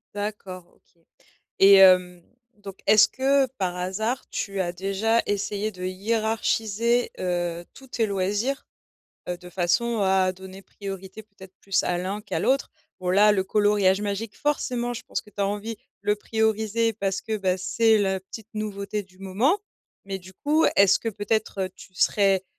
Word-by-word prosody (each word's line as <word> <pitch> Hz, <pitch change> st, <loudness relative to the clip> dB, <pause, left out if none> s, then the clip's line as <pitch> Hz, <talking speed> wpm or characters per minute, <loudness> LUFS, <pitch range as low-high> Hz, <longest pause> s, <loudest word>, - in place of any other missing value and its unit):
D'accord, 205 Hz, -3 st, -5 dB
OK 170 Hz, -, -35 dB, 0.6 s
et 200 Hz, 0 st, +9 dB
hem, 180 Hz, -2 st, +6 dB, 0.3 s
donc 200 Hz, -2 st, -11 dB
est-ce 215 Hz, 0 st, +7 dB
que, 270 Hz, +1 st, +2 dB
par 180 Hz, -2 st, -1 dB
hasard, 205 Hz, +7 st, -2 dB
tu 195 Hz, -1 st, -3 dB
as 175 Hz, -2 st, 0 dB
déjà 195 Hz, +5 st, +1 dB
essayé 205 Hz, +1 st, -1 dB
de 180 Hz, -2 st, -9 dB
hiérarchiser, 220 Hz, +3 st, 0 dB
heu, 175 Hz, -1 st, -2 dB
tous 265 Hz, -, -13 dB
tes 230 Hz, -3 st, -1 dB
loisirs, 205 Hz, +7 st, -1 dB, 0.6 s
heu, 180 Hz, -, -2 dB
de 180 Hz, 0 st, -13 dB
façon 190 Hz, +7 st, 0 dB
à 190 Hz, -1 st, +3 dB
donner 190 Hz, +1 st, -11 dB
priorité, 195 Hz, +1 st, -8 dB
peut-être, 190 Hz, -3 st, -15 dB
plus 195 Hz, -1 st, +1 dB
à 175 Hz, -1 st, -1 dB
l'un 190 Hz, +3 st, -3 dB
qu'à 210 Hz, -, -4 dB
l'autre? 275 Hz, +1 st, +1 dB, 0.3 s
Bon, 180 Hz, 0 st, -1 dB
là, 210 Hz, +3 st, +6 dB
le 190 Hz, -2 st, +1 dB
coloriage 205 Hz, -1 st, +2 dB
magique, 205 Hz, +1 st, -4 dB
forcément, 250 Hz, -4 st, -1 dB
je -, -, -7 dB
pense -, -, -3 dB
que 210 Hz, -, -19 dB
tu 205 Hz, -, -8 dB
as 200 Hz, -, +2 dB
envie 210 Hz, +3 st, -4 dB, 0.3 s
le 210 Hz, -, +2 dB
prioriser 220 Hz, +1 st, 0 dB
parce 195 Hz, -2 st, -2 dB
que, 220 Hz, -1 st, -3 dB
bah, 190 Hz, -2 st, 0 dB
c'est 220 Hz, +4 st, +3 dB
la 190 Hz, -1 st, 0 dB
petite 210 Hz, +3 st, -11 dB
nouveauté 210 Hz, -1 st, -3 dB
du 185 Hz, -1 st, -23 dB
moment, 210 Hz, -, +1 dB, 0.5 s
mais 195 Hz, -1 st, -4 dB
du 185 Hz, +1 st, -14 dB
coup, 305 Hz, -, +1 dB
est-ce 200 Hz, 0 st, +6 dB
que, 230 Hz, -, -2 dB
peut-être, 210 Hz, -1 st, -2 dB
heu, 185 Hz, -, -1 dB
tu 185 Hz, -, -15 dB
serais, 195 Hz, +2 st, +3 dB
200 Hz, 165 wpm, -25 LUFS, 190-220 Hz, 0.6 s, et